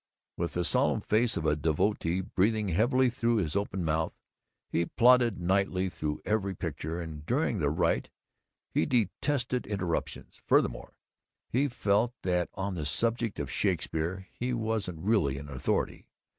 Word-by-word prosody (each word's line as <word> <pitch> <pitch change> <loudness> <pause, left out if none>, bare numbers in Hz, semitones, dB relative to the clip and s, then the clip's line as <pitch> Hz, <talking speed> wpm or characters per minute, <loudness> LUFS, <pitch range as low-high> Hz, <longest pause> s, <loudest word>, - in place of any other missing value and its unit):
With 85 0 -2
the 90 0 0
solemn 125 0 +2
face 110 +3 +2
of 80 - -3
a 75 -1 +3
devotee, 85 +3 0
breathing 105 +3 +1
heavily 125 - +3
through 115 0 +1
his 90 -8 0
open 95 -3 -1
mouth, 80 +1 0 0.5
he 85 0 0
plodded 120 -4 +4
nightly 95 +1 +1
through 75 -3 -3
every 100 -3 0
picture, 80 0 -4
and 80 -3 -6
during 75 - 0
the - - +2
rite - - +1 0.6
he 80 - +1
detested 125 +3 0
interruptions. 95 -5 -3
Furthermore, - - +1 0.6
he 135 +4 +2
felt 120 -1 +1
that 90 -1 +1
on 95 0 -2
the 80 -4 -3
subject 115 +3 0
of 70 -1 -3
Shakespeare 90 +1 -1
he 125 +1 -2
wasn't 110 -6 -2
really 95 -12 +2
an 70 +1 -8
authority. 65 -2 -2
95 Hz, 145 wpm, -29 LUFS, 85-115 Hz, 0.6 s, plodded